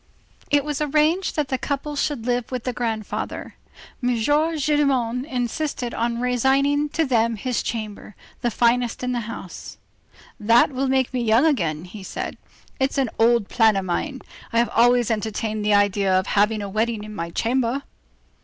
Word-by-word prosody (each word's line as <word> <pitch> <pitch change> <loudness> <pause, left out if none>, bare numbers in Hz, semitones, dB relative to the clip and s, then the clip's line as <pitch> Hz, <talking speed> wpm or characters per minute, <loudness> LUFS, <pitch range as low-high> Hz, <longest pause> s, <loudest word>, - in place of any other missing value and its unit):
It 290 -1 +3
was 295 -1 -3
arranged 305 +5 +1
that 295 -3 -1
the 260 - -1
couple 290 +3 -3
should 285 -5 -1
live 245 -1 -1
with 250 -2 -3
the 250 - -2
grandfather—M. 235 +2 -4
Gillenormand 290 -2 +1
insisted 250 -1 -2
on 235 0 -1
resigning 270 +4 +2
to 325 +2 0
them 230 -3 +2
his 245 +3 -2
chamber, 215 -3 -5 0.3
the 240 - +1
finest 240 +1 +1
in 250 - -1
the 245 - -1
house. 190 -5 -8 0.6
"That 230 +5 +4
will 270 +1 -1
make 260 -1 +1
me 250 - 0
young 230 +4 +4
again," 170 - 0
he 195 +3 -10
said. 190 - -5 0.4
"It's 270 +2 0
an 265 -4 +1
old 230 -2 +4
plan 225 -3 +4
of 195 -1 -1
mine. 260 - -2 0.3
I 230 - -1
have 235 +1 +3
always 240 0 +4
entertained 215 0 -2
the 210 0 +3
idea 205 -1 +2
of 185 0 +3
having 210 +1 +1
a - - -4
wedding 215 +2 -1
in 215 0 -8
my 170 -4 -4
chamber." 245 +7 0
240 Hz, 165 wpm, -23 LUFS, 220-270 Hz, 0.6 s, That